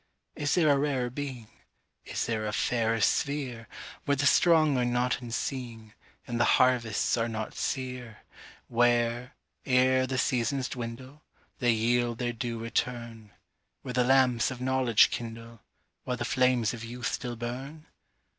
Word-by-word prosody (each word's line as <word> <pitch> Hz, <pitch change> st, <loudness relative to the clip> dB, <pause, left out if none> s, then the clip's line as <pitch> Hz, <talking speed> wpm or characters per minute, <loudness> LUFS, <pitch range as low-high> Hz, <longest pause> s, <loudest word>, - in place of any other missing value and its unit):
Is 145 Hz, -1 st, 0 dB
there 165 Hz, -4 st, +4 dB
a 140 Hz, -1 st, +4 dB
rarer 135 Hz, -4 st, -1 dB
being, 130 Hz, -4 st, -6 dB, 0.6 s
Is -, -, -2 dB
there 110 Hz, -2 st, -2 dB
a 105 Hz, -, -3 dB
fairer 115 Hz, +1 st, +1 dB
sphereWhere 125 Hz, +1 st, -1 dB, 0.4 s
the 140 Hz, 0 st, +1 dB
strong 155 Hz, -1 st, +5 dB
are -, -, +2 dB
not 125 Hz, +1 st, 0 dB
unseeing, 115 Hz, -2 st, -5 dB, 0.3 s
And 120 Hz, -1 st, -3 dB
the -, -, +5 dB
harvests 120 Hz, -5 st, +2 dB
are 115 Hz, 0 st, 0 dB
not 110 Hz, -1 st, -4 dB
sere; 125 Hz, -4 st, -4 dB, 0.4 s
Where, 120 Hz, +1 st, +1 dB, 0.3 s
ere 130 Hz, 0 st, +3 dB
the 130 Hz, 0 st, -2 dB
seasons 130 Hz, +1 st, 0 dB
dwindle, 130 Hz, +4 st, -7 dB, 0.4 s
They 120 Hz, -2 st, +3 dB
yield 120 Hz, +1 st, +1 dB
their 120 Hz, -1 st, -2 dB
due 115 Hz, 0 st, -4 dB
return; 115 Hz, -1 st, -3 dB, 0.5 s
Where 125 Hz, -, -5 dB
the 125 Hz, 0 st, +3 dB
lamps 125 Hz, -2 st, +3 dB
of 130 Hz, -2 st, -7 dB
knowledge 130 Hz, -3 st, +3 dB
kindleWhile 115 Hz, 0 st, -7 dB, 0.6 s
the 120 Hz, -, -3 dB
flames 125 Hz, -3 st, +2 dB
of 115 Hz, -1 st, -7 dB
youth 120 Hz, +1 st, -4 dB
still 120 Hz, -1 st, -4 dB
burn? 130 Hz, +7 st, -6 dB
120 Hz, 140 wpm, -28 LUFS, 115-130 Hz, 0.6 s, strong